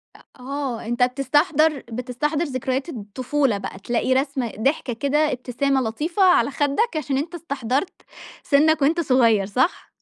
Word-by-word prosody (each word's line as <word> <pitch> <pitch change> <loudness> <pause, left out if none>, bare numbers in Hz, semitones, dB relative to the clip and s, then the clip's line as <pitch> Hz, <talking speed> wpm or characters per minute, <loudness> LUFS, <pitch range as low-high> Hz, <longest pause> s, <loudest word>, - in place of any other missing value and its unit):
أ - - -16 0.2
آه. 265 -3 -4
أنت 240 +2 0
بتستحضَر 295 +3 +2
بتستحضَر 255 +6 -2
ذكريات 260 +2 -3
الطفولة 255 +2 -1
بقى، 195 -1 -7
تلاقي 240 +5 0
رسمة 265 -3 -1
ضحكة 265 0 0
كده، 295 +5 +1
ابتسامة 260 +2 -1
لطيفة 305 - -1
على 360 -5 +4
خَدّك، 300 - 0
عشان 275 -3 -1
أنت 330 +5 -3
استحضَرت 280 0 -2 0.5
سِنّك 310 +1 +3
وأنت 320 +5 +2
صغير 235 - +3
صح؟ 255 - 0
275 Hz, 140 wpm, -22 LUFS, 250-300 Hz, 0.5 s, على